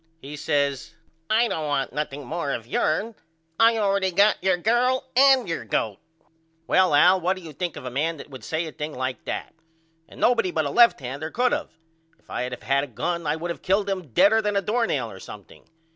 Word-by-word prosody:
He 145 +1 -9
says 140 -2 -1 0.3
I 230 +2 +3
don't 155 -8 -3
want 135 -4 -1
nothing 145 -1 -4
more 155 0 -3
of 115 - -5
yourn. 160 - -1 0.5
I 230 0 +6
allready 200 -2 +1
got 200 -1 +3
your 190 -1 +3
girl 245 +7 +1
and 265 -3 +5
your 165 -7 -3
goat. 105 -1 -2 0.7
Well 185 -2 +3
Al 180 +5 +5
what 185 +3 +1
do 185 - -11
you 160 -2 -10
think 175 +2 -4
of 130 - -9
a 125 - -5
man 155 +5 -1
that - - -10
would 130 - -10
say 160 +1 -2
a 160 - -7
thing 150 +1 -6
like 130 0 -4
that? - - -5 0.6
And - - -14
nobody 235 -6 +3
but 160 -3 -1
a 140 - -2
left 235 +8 +5
hander 135 +5 -5
could 250 - +1
of. 295 +1 -2 0.5
If - - -21
I - - -2
had 125 0 -3
of - - -9
had 140 +1 +1
a - - -5
gun 170 +6 -3
I 150 - +1
would 170 +2 -4
of - - -7
killed 200 +2 +1
him 190 -4 -3
deader 205 - +4
than 210 -1 -1
a 200 - +2
doornail 210 - -1
or 95 - -11
something. 100 0 -12
165 Hz, 220 wpm, -24 LUFS, 140-205 Hz, 0.7 s, I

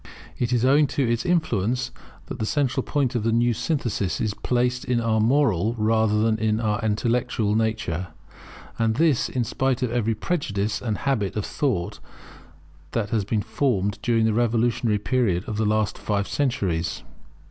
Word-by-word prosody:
It 120 0 0
is 125 0 +2
owing 145 +3 +5
to 135 -3 +2
its 120 +8 -1
influence 125 - 0 0.3
that - - -7
the 110 - -1
central 135 -1 0
point 140 -2 -1
of 120 - 0
the 115 +2 +1
new 120 +1 +3
synthesis 115 - -1
is 110 -2 -1
placed 125 +2 0
in 125 -1 0
our 115 -1 +1
moral 115 - +2
rather 110 -1 +2
than 110 -1 +1
our 105 -2 0
intellectual 110 0 0
nature; 110 -6 -1 0.7
and 115 -1 +2
this, 155 -3 +2
in 125 - -1
spite 130 +2 -1
of 125 - -1
every 115 -2 0
prejudice 105 - -2
and 110 -4 -2
habit 115 -9 -1
of 105 - -2
thought 125 - -2 0.9
that 110 -3 -1
has 110 -3 +1
been 105 +1 -1
formed 105 -7 0
during 115 -2 +2
the 110 - +2
revolutionary 115 -1 +1
period 105 -5 0
of 110 - -3
the 110 -1 +1
last 110 -1 0
five 100 -1 -1
centuries. 95 - -1
115 Hz, 165 wpm, -24 LUFS, 105-125 Hz, 0.9 s, owing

